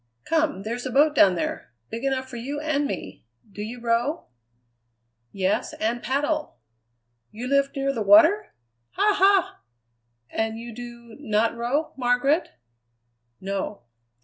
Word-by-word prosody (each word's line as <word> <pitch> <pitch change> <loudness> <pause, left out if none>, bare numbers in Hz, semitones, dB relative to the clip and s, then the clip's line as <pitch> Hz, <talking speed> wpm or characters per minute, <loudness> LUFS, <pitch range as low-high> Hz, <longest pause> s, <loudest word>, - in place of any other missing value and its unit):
Come, 315 - 0
there's 240 +4 -4
a - - -5
boat 295 +4 +4
down 195 -10 +5
there, 125 -7 -4 0.2
big 230 +2 -5
enough 265 -1 -1
for 250 -2 -8
you 280 +5 -4
and 295 -2 0
me. - - -6 0.3
Do 205 - -8
you 230 +4 -6
row?" 235 +7 -1 1.0
"Yes, 195 +4 -1
and 230 +2 -2
paddle." 295 +3 -1 0.7
"You 235 +4 -6
lived 275 +1 +2
near 275 0 0
the 230 - -3
water! 325 - +5 0.4
Ha! 415 +1 +3
ha!" 390 -1 +3 0.7
"And 220 0 -1
you 235 0 -8
do 235 -1 -10
not 225 -4 +1
row, 245 +7 -1
Margaret?" 260 +6 +2 0.9
"No." 195 -1 -4
245 Hz, 135 wpm, -25 LUFS, 225-290 Hz, 1.0 s, down